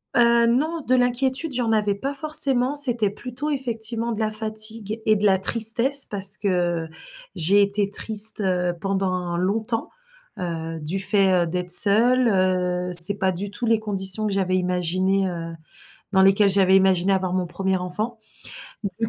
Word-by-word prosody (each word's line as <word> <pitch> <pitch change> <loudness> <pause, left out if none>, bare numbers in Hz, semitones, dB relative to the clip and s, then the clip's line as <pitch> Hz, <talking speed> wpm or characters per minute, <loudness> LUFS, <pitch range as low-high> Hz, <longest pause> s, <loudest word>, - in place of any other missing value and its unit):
Heu, 235 -1 +3
non, 310 +8 -2
de 255 - +2
l'inquiétude, 260 +4 -1
j'en 240 -2 -2
avais 210 -2 -1
pas 270 +8 -6
forcément, 280 -3 +4
c'était 245 -7 +1
plutôt, 250 +7 -7
effectivement, 235 -4 -4
de 220 - -6
la 215 -1 -2
fatigue 215 0 -5
et 215 - +2
de 210 0 -3
la 190 -2 +2
tristesse 235 +7 +4
parce 200 0 +1
que 175 -4 -3 0.5
j'ai 190 +4 +1
été 200 0 -1
triste, 215 +1 +5
heu, 180 -2 -2
pendant 185 -3 -3
longtemps, 220 +5 -3 0.5
heu, 165 -2 -6
du 170 +6 -4
fait, 190 -2 +2
heu, - - -5
d'être 180 +1 -2
seule. 235 +7 +6
Heu, 180 -3 -2
c'est 175 +4 +2
pas 190 0 0
du 195 +3 -7
tout 240 +4 -6
les 225 -1 +1
conditions 205 0 +1
que 205 - -4
j'avais 185 -1 -2
imaginées, 185 +2 -2
heu, 165 -1 -8 0.6
dans 190 - +3
lesquelles 195 +1 +3
j'avais 190 -1 +2
imaginé 190 0 0
avoir 185 -1 -2
mon 185 -1 -2
1er 190 +2 -3
enfant. 200 +6 -5 0.7
Donc 200 -2 -5
du 225 - -2
200 Hz, 165 wpm, -21 LUFS, 185-230 Hz, 0.7 s, seule